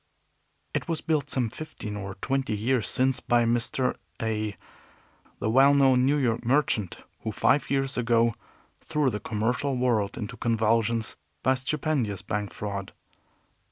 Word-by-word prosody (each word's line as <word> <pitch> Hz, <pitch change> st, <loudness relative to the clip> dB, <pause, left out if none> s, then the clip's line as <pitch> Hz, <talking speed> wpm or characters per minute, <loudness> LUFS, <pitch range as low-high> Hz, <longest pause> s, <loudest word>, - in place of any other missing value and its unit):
It -, -, -2 dB
was 165 Hz, -2 st, -1 dB
built 150 Hz, -3 st, 0 dB
some 125 Hz, -5 st, 0 dB
fifteen 110 Hz, -9 st, -7 dB
or 100 Hz, -2 st, -5 dB
twenty 135 Hz, -5 st, -1 dB
years 115 Hz, +1 st, +1 dB
since 130 Hz, 0 st, +2 dB
by 120 Hz, -1 st, +2 dB
Mr. 120 Hz, +2 st, +1 dB, 0.2 s
A, 110 Hz, -2 st, -2 dB, 0.8 s
the -, -, -2 dB
well 135 Hz, +3 st, +6 dB
known 130 Hz, -2 st, +5 dB
New 145 Hz, +2 st, +3 dB
York 120 Hz, -5 st, 0 dB
merchant, 120 Hz, -, +1 dB, 0.2 s
who 110 Hz, -, -4 dB
five 140 Hz, +6 st, +2 dB
years 135 Hz, 0 st, 0 dB
ago 115 Hz, -1 st, +3 dB, 0.5 s
threw 150 Hz, -4 st, 0 dB
the 105 Hz, -, -3 dB
commercial 120 Hz, +6 st, -1 dB
world 115 Hz, -5 st, +1 dB
into 115 Hz, +2 st, -5 dB
convulsions 115 Hz, 0 st, +1 dB, 0.3 s
by 130 Hz, -, +4 dB
a -, -, +4 dB
stupendous 130 Hz, -, -1 dB
bank 105 Hz, -1 st, -3 dB
fraud. 100 Hz, -2 st, -5 dB
120 Hz, 145 wpm, -27 LUFS, 110-135 Hz, 0.8 s, well